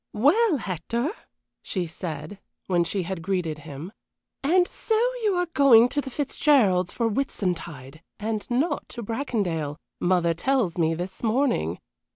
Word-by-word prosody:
"Well, 310 - +4
Hector," 235 - -2 0.5
she 185 -3 -2
said, 160 +2 -6 0.3
when 175 -2 +2
she 185 +3 -2
had 180 0 -4
greeted 175 -4 -2
him, 150 +4 -8 0.5
"and 355 +5 +3
so 445 - -1 0.2
you 420 -4 +2
are 355 0 +1
going 250 -4 +7
to 290 +3 -1
the 270 - -7
Fitzgeralds' 250 - +2
for 230 - 0
Whitsuntide, 175 - -3 0.2
and 215 0 -3
not 285 +5 0
to 235 - -7
Bracondale, 200 - -2 0.2
mother 175 -2 +2
tells 200 -2 0
me 165 0 +2
this 180 +3 -6
morning. 225 - +1
200 Hz, 140 wpm, -25 LUFS, 170-270 Hz, 0.5 s, going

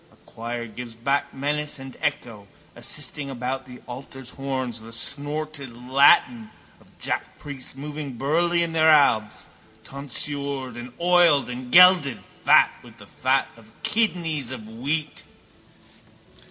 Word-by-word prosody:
A - - -23
choir 115 +1 -6
gives 115 +1 -9
back 135 +5 -1
menace 145 +2 -2
and 135 -1 -10
echo, 120 -9 -3 0.3
assisting 140 -2 -3
about 130 +1 -4
the 125 -1 -12
altar's 130 0 -9
horns, 130 -4 -4
the 115 +1 -12
snorted 145 0 0
Latin 125 -3 +4 0.3
of - - -22
jackpriests 135 -3 -4
moving 145 0 -6
burly 170 +6 +1
in 170 - -2
their 160 0 +4
albs, 110 -8 +3 0.4
tonsured 140 -1 -3
and 120 +1 -8
oiled 170 -6 +4
and 125 0 -7
gelded, 180 -6 +6 0.2
fat - - +6
with 120 -1 -16
the 105 - -14
fat 130 +6 0
of 115 -1 -18
kidneys 175 - 0
of 120 -5 -7
wheat. 145 +7 -4
135 Hz, 125 wpm, -24 LUFS, 120-150 Hz, 0.4 s, gelded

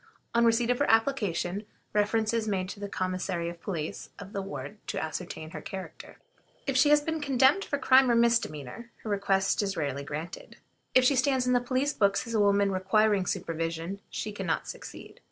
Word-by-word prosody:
On 235 0 +4
receipt 230 +1 +3
of 245 - 0
her 285 - +2
application, 210 -6 +1 0.3
reference 215 +1 +1
is 225 -1 0
made 185 -3 -1
to 205 - -7
the 205 0 -5
Commissary 185 -3 -2
of 170 -1 -10
Police 165 -6 -4
of 200 0 -10
the 200 - -2
ward 200 +2 -7
to - - -2
ascertain 160 0 -5
her - - -7
character. 190 -1 -8 0.5
If 275 - -1
she 275 +3 +5
has 295 0 +6
been 320 +1 -3
condemned 275 +6 +4
for 285 - -2
crime 260 -1 +5
or 235 - +4
misdemeanor, 230 - 0
her 215 - -4
request 195 -1 +1
is 195 -1 -2
rarely 140 -3 -2
granted. 155 +4 -7 0.4
If 255 - +7
she 275 - +4
stands 260 0 +2
in 250 - +2
the 245 - +3
police 260 +4 0
books 200 +2 +2
as 230 - -6
a 220 - +2
woman 200 -1 +3
requiring 195 +1 +2
supervision, 165 0 -3
she 215 - -4
can 195 -3 -5
not 160 - -1
succeed. - - -9
205 Hz, 195 wpm, -28 LUFS, 185-245 Hz, 0.5 s, If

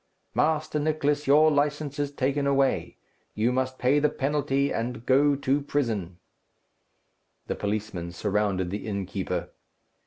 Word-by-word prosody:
Master 155 -1 +1
Nicless, 150 -1 0
your 155 +3 +6
licence 145 0 0
is 145 -1 -1
taken 140 0 0
away; 135 -1 +1 0.4
you 110 +3 +2
must 130 0 -1
pay 135 +3 +3
the 150 +1 +3
penalty, 140 -1 0
and 120 0 -3
go 140 +2 +4
to 140 +1 0
prison." 110 -12 -2 1.3
The - - -2
policemen 100 -4 -3
surrounded 100 -1 -1
the 105 +2 -4
innkeeper. 95 -3 -3
135 Hz, 125 wpm, -26 LUFS, 105-145 Hz, 1.3 s, your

